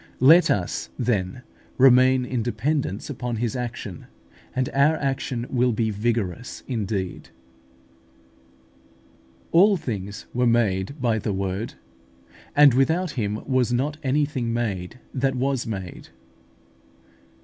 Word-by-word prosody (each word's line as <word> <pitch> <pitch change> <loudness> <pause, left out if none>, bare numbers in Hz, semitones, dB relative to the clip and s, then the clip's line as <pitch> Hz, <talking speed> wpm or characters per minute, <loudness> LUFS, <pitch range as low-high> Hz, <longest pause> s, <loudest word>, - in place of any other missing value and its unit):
24). 130 - +3
Let 170 +4 +7
us, - - -5
then, 110 -2 -1 0.4
remain 130 0 +5
in 125 -1 -2
dependence 120 -1 -2
upon 125 -4 -4
His 115 +1 -2
action, 120 -7 -6 0.5
and 130 -1 0
our 140 +3 +4
action 135 -4 -2
will 125 -1 +1
be 110 0 0
vigorous 110 0 -2
indeed. 105 -6 -3 2.2
"All 195 +4 +5
things 100 - -5
were 125 0 +2
made 115 +2 +1
by 115 -3 +1
(the 105 0 -2
Word); 95 +3 -3 0.8
and 145 -3 +7
without 160 +7 +2
Him 105 -5 -3
was 130 -3 +1
not 140 +5 0
anything 135 -3 0
made 110 -2 -3
that 135 0 0
was 130 -1 -1
made" 95 -5 -6
(John - - -21
i. 65 0 -32
120 Hz, 125 wpm, -24 LUFS, 105-135 Hz, 2.2 s, Let